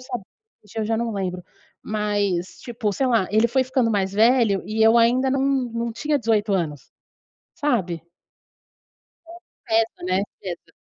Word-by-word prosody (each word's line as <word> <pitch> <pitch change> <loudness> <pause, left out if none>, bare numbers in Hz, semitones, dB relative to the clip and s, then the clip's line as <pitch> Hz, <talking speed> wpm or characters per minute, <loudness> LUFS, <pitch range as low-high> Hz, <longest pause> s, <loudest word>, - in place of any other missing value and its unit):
sabia, 245 -5 -6 0.4
hoje 210 +2 -9
eu 215 - 0
já 225 +1 0
não 230 -1 -2
lembro, 180 -2 -3 0.4
mas 205 -4 -1
tipo, 230 -4 -2
sei 265 +6 0
lá, 230 -6 +2
ele 220 +2 +4
foi 265 +2 +2
ficando 255 -3 +1
mais 195 -2 0
velho 225 -2 +3
e 220 +1 0
eu 225 +1 +6
ainda 245 +3 +4
não 270 0 +1
não 240 -4 -1
tinha 295 +5 0
18 215 -3 +1
anos. 155 -7 -2 0.6
Sabe? 185 - -1 1.3
É - - -10
o 350 - -13 0.3
certo, 225 -4 0
né? 185 +1 +1 0.2
Cedo. 175 -3 -7
220 Hz, 160 wpm, -23 LUFS, 195-240 Hz, 1.3 s, eu